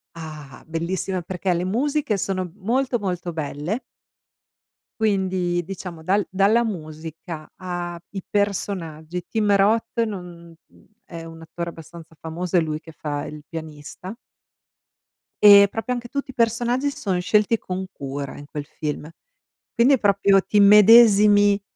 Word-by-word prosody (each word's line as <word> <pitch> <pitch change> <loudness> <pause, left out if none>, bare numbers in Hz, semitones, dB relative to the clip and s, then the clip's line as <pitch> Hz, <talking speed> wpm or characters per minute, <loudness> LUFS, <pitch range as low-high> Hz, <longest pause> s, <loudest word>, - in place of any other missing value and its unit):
Ah! 155 -4 -10
Bellissima 175 +3 -2
perché 180 +1 -2
le 175 +1 -1
musiche 255 +1 0
sono 185 -2 -2
molto, 245 +5 0
molto 180 -3 -3
belle. 155 - -4 1.2
Quindi, 185 -4 0
diciamo, 180 -3 -8
dal 195 +3 +1
dalla 205 +5 +3
musica 160 -3 -7
a 175 -2 -5
i 195 -2 -6
personaggi. 180 -5 -2
Tim 210 -3 +2
Roth 225 +4 +2
non 175 -6 -6 0.5
è 165 -1 -9
un 165 0 -11
attore 170 +1 -6
abbastanza 165 0 -12
famoso, 170 +2 -2
è - - +6
lui 155 -1 -2
che 160 - -13
fa 145 -1 -4
il 150 0 -9
pianista. 160 +4 -8 1.3
Ehm, 200 -1 +9
proprio 225 +4 -3
anche 240 0 -7
tutti 280 -1 -4
i - - -22
personaggi 240 +3 +1
s - - -11
sono 190 -3 -1
scelti 210 +4 +2
con 190 -1 -5
cura 140 0 -6
in 145 - -10
quel 145 0 -6
film. 150 0 -5 0.6
Quindi 250 +4 +4
è 260 - +3
proprio 200 -1 +4
t'immedesimi, 205 -1 +6
185 Hz, 135 wpm, -23 LUFS, 165-210 Hz, 1.3 s, Ehm